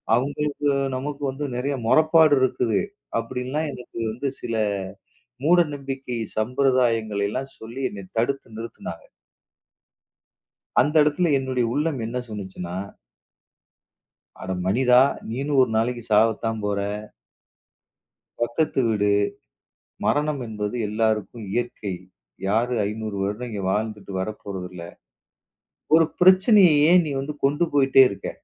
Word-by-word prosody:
அவங்களுக்கு 145 +3 -1 0.3
நமக்கு 145 +2 -5
வந்து 140 +2 -5
நிறைய 140 +3 -1
முறைப்பாடு 155 +2 +5
இருக்குது. 125 -3 +1 0.4
அப்படின்னு 125 +2 -5
எல்லாம் 155 +2 -1
எனக்கு 125 -1 -9
வந்து 125 +5 -3
சில 115 - -3 0.9
மூடநம்பிக்கை, 140 -7 +1 0.2
சம்பிரதாயங்களை 115 -3 +1
எல்லாம் 135 +5 -5
சொல்லி 115 +4 -8
என்னைத் 100 -2 -11
தடுத்து 120 -1 -1
நிறுத்துனாங்க. 115 +1 -8 1.8
அந்த 145 +3 0
இடத்துல 150 +3 +1
என்னுடைய 130 -2 -1
உள்ளம் 150 -3 -1
என்ன 115 +3 -4
சொன்னுச்சுன்னா. 95 -4 -6 1.7
அட - - -7 0.2
மனிதா. 125 +5 +5 0.3
நீயும் 135 +4 0
ஒரு 130 - +3
நாளைக்கு 120 +1 -1
சாவத்தான் 110 +1 +2
போற 100 -1 -1 1.6
பக்கத்து 120 +5 0
வீடு. 105 -2 +1 1.0
மரணம் 150 -1 +1
என்பது 105 0 -4
எல்லாருக்கும் 110 0 -1
இயற்கை. 120 -5 -3 0.5
யாரு 115 +5 +1
500 110 0 -5
வருடம் 105 +5 -3
இங்க 105 -3 -5
வாழ்ந்துட்டு 105 -1 -3
வரப்போறது 95 -2 -5
இல்ல. 90 -2 -8 1.1
ஒரு 165 -1 +5
பிரச்சனையை 185 -1 +6 0.2
ஏன் 180 0 +6
நீ 145 - -3
வந்து 145 +2 -5
கொண்டு 145 +5 +2
போயிட்டே 135 -1 +6
இருக்க? 100 - -6
125 Hz, 110 wpm, -24 LUFS, 110-145 Hz, 1.8 s, பிரச்சனையை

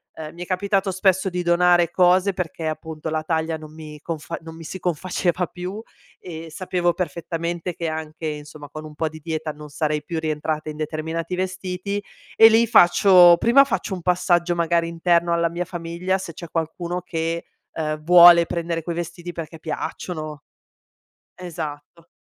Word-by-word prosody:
Ehm, 155 0 -8
mi 175 - -6
è - - -8
capitato 195 +1 0
spesso 190 0 +2
di 180 0 -2
donare 175 0 +4
cose 185 +2 +3
perché 165 -3 -4
appunto 155 0 -5
la 155 0 -2
taglia 160 0 -1
non 155 0 -12
mi 155 -1 -10
confa 165 +1 -5
non 160 0 -10
mi 165 - -10
si 165 - -6
confaceva 180 +1 -1
più 185 +4 -6 0.4
e 165 -2 -8
sapevo 175 +1 0
perfettamente 170 0 -3
che 170 0 -4
anche, 155 0 -5
insomma, 150 -1 -7
con 155 0 -8
un 155 - -10
po' 160 +1 -2
di 155 0 -11
dieta 160 0 -3
non 150 0 -11
sarei 150 0 -1
più 165 -2 -3
rientrata 155 0 -2
in 150 - -7
determinati 160 +3 -4
vestiti 185 +2 -3 0.3
e 225 - +9
lì 225 +1 +4
faccio 180 -3 +7
prima 240 +7 +6
faccio 245 -7 -2
un 180 - -9
passaggio 175 -1 +2
magari 170 0 +1
interno 170 0 +1
alla 170 0 +1
mia 175 +2 -3
famiglia, 175 +2 -3
se 170 -3 -7
c'è 170 +1 -9
qualcuno 170 +2 -3
che, 165 -1 -3 0.3
uhm, 155 -1 -3
vuole 170 0 +8
prendere 170 -1 -3
quei 170 +1 -4
vestiti 175 +1 -5
perché 165 -1 -7
piacciono. 155 -1 -5 0.9
Esatto. 165 -2 -8
170 Hz, 165 wpm, -22 LUFS, 160-180 Hz, 0.9 s, e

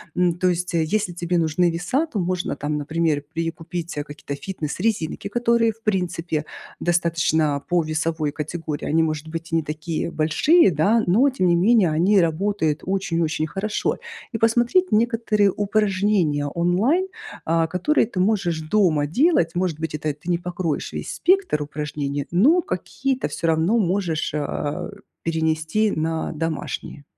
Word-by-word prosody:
М, 180 -1 +2
то 185 +1 +2
есть, 180 0 -2
если 175 +4 0
тебе 175 +1 -1
нужны 165 +2 +2
веса, 180 - 0
то 265 -10 -4
можно 180 -2 -1
там, 150 +1 -2
например, 155 0 0
перекупить, 165 0 -4
э, 145 - -1
какие-то 145 -1 -7
фитнес-резинки, 190 +6 -2 0.3
которые, 235 0 +2
в 225 +1 -19
принципе, 175 -6 -1 0.3
достаточно 160 -4 +1
по 175 -1 +3
весовой 155 -1 -1
категории, 155 0 -5
они, 160 +2 +2
может 155 -1 -2
быть, 165 +1 -6
и - - +1
не 165 - +2
такие 155 +2 -3
большие, 190 - +4
да, 195 +9 +3
но, 230 +11 +4
тем 250 -9 0
не 175 - +4
менее, 200 +1 +4
они 180 +6 +3
работают 165 -2 0
очень-очень 165 -5 -1
хорошо. 205 +6 -2 0.4
И - - 0
посмотреть 240 - +2
некоторые 220 -2 +2
упражнения 195 -7 +1
онлайн, 185 - +1 0.4
а, 165 0 +2
которые 185 - +1
ты 185 - -5
можешь 185 -4 +1
дома 155 -4 +2
делать. 180 - +2
Может 175 -4 -1
быть, 160 -1 -3
это 150 0 -2
ты 150 +5 -10
не 175 - +2
покроешь 175 -2 -3
весь - - -5
спектр 375 - +2
упражнений, 145 -1 -4
но 270 - +5
какие-то 270 -7 -2
всё 165 - -3
равно 165 +7 +2
можешь, 180 -6 0
а, 145 -1 -3 0.3
перенести 160 +5 0
на 160 -1 -2
домашние. 155 -2 -4
170 Hz, 150 wpm, -22 LUFS, 155-205 Hz, 0.4 s, но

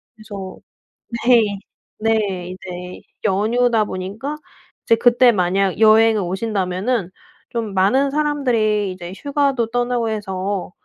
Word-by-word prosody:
그래서 205 -4 -8 0.7
네. 240 -3 +6 0.6
네. 225 +1 +2 0.4
이제 180 -1 -8 0.2
연휴다 220 +3 +2
보니까 210 +10 -5 0.5
이제 230 - +4
그때 240 +1 +4
만약 190 0 +1
여행을 220 0 +5
오신다면은 190 +2 -2 0.4
좀 230 -4 -4
많은 210 +9 +3
사람들이 245 -9 0
이제 175 -1 -9
휴가도 280 -5 0
떠나고 245 -1 0
해서 195 -3 -3
215 Hz, 245 characters per minute, -20 LUFS, 190-245 Hz, 0.7 s, 네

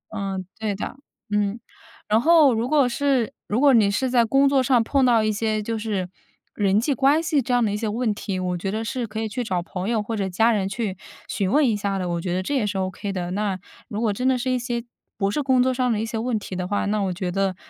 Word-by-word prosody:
嗯， 195 -2 -3
对 215 -2 -1
的。 205 - -5 0.4
嗯， 210 +2 0 0.5
然 215 +2 +3
后 315 -4 +6
如 230 +3 -1
果 290 -4 +4
是 260 -2 0
如 215 +4 0
果 280 -2 +6
你 210 -4 +5
是 255 +6 0
在 245 -2 +4
工 270 +5 +3
作 275 -1 +3
上 250 -2 +3
碰 275 +3 +1
到 230 -3 +4
一 215 - +1
些 215 0 -1
就 225 +1 -3
是 210 -4 -2 0.5
人 200 -1 +2
际 275 +6 +1
关 280 +4 +3
系 305 -4 +1
这 250 - -4
样 245 -1 +3
的 205 - 0
一 205 - -1
些 220 0 -2
问 220 0 0
题， 195 -2 -4
我 180 -1 -2
觉 190 +3 -3
得 220 +2 -2
是 245 0 -3
可 220 +1 -5
以 220 - -1
去 245 +4 -3
找 185 -6 -1
朋 185 +3 -4
友 220 -3 +1
或 225 +2 -4
者 195 -2 -1
家 225 +6 +3
人 195 -3 0
去 200 -3 -3 0.3
询 195 0 -1
问 290 -2 +4
一 220 - +2
下 200 -1 -2
的， 185 -1 -2
我 170 0 -2
觉 175 0 -2
得 185 - -1
这 285 +9 -2
也 245 - +1
是 200 -1 -2
OK 190 +2 -3
的。 180 -2 -3
那 200 0 -1 0.3
如 210 - -4
果 215 -3 +1
真 250 +5 -1
的 260 - +3
是 255 +1 -1
一 255 - +1
些 240 -1 -3 0.3
不 195 -1 0
是 295 - -1
工 260 -2 +3
作 260 - +1
上 250 -1 +1
的 215 - 0
一 225 - -1
些 225 0 -4
问 235 0 -1
题 195 -3 -6
的 180 0 -3
话， 205 - -1
那 210 +1 0
我 190 -2 0
觉 180 0 -3
得 195 0 0
220 Hz, 295 characters per minute, -23 LUFS, 195-250 Hz, 0.5 s, 后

